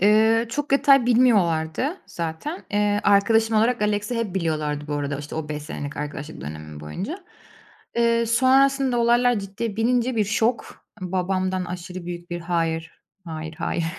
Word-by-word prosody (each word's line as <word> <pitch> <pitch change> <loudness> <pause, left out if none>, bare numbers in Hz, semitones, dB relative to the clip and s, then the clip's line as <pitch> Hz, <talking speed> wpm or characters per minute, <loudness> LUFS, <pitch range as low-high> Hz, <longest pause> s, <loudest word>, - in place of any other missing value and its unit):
Eee, 220 +3 +4
çok 290 +4 -3
detay 275 -2 +5
bilmiyorlardı 225 - +2
zaten. 170 - -5
Eee, 205 0 +1
arkadaşım 220 +2 +4
olarak 225 +1 +2
Alex'i 210 +3 0
hep 215 -5 -2
biliyorlardı 155 -4 -1
bu 145 - -1
arada, 145 -1 -2
işte, 145 0 -7
o 155 -1 -4
5 150 -1 -4
senelik 145 -1 -6
arkadaşlık 150 - -6
dönemim 75 +1 -8
boyunca. 205 - -6 0.7
Eee, 235 0 +3
sonrasında 265 +1 +3
olaylar 240 0 +3
ciddiye 200 +2 -5
binince 245 +1 +1
bir 215 - +3
şok, 225 +3 -1 0.2
babamdan 185 0 -1
aşırı 180 0 -7
büyük 175 0 -7
bir 175 0 -3
"Hayır, 165 -1 -1 0.3
hayır, 160 -1 -6
hayır." 170 - -1
200 Hz, 145 wpm, -23 LUFS, 160-235 Hz, 0.7 s, detay